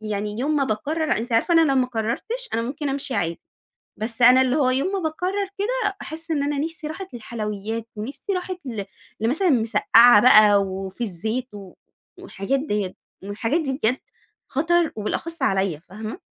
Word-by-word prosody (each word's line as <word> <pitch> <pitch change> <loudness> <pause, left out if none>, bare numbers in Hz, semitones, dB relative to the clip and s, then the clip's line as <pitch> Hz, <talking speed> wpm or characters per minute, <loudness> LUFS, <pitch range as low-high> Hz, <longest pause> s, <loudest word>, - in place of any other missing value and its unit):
يعني 210 0 -4
يوم 295 +4 0
ما 275 - +2
باقرر 305 +8 -1
أنتِ 235 +2 -5
عارفة 230 +10 +2
أنا 330 - +7
لو - - +2
ما 260 -1 +3
قررتش 250 - -3
أنا 230 - 0
ممكن 280 +5 -4
أمشي 275 -1 -3
عادي، 170 -4 -1 0.6
بس 225 +2 -4
أنا 255 +2 +8
اللي 260 +2 +1
هو 260 -4 +3
يوم 275 +9 0
ما 395 - 0
باقرر 370 +4 -2
كده 415 -1 -1
باحس 325 +2 -8
إن 295 -3 +1
أنا 290 0 -1
نِفْسي 320 +1 -4
راحت 370 +1 -7
للحلويات، 220 -1 -5
نِفْسي 270 - -5
راحت 365 -1 -3
ل 225 -5 -4 0.4
لمثلًا 305 - +2
مسقعة 230 -2 +6
بقى 215 -4 +7
وفي 190 +1 -6
الزيت 220 +5 -4
و 195 -3 -10 0.5
والحاجات 265 +8 -2
ديّة 205 -9 -2 0.3
والحاجات 225 +10 -1
دي 275 -4 -2
بجد 255 -1 0 0.5
خطر 330 +4 +1
وبالأخص 330 +10 -4
عليَّ، 190 -5 +1
فاهمة؟ 215 - -7
250 Hz, 170 wpm, -23 LUFS, 215-315 Hz, 0.6 s, أنا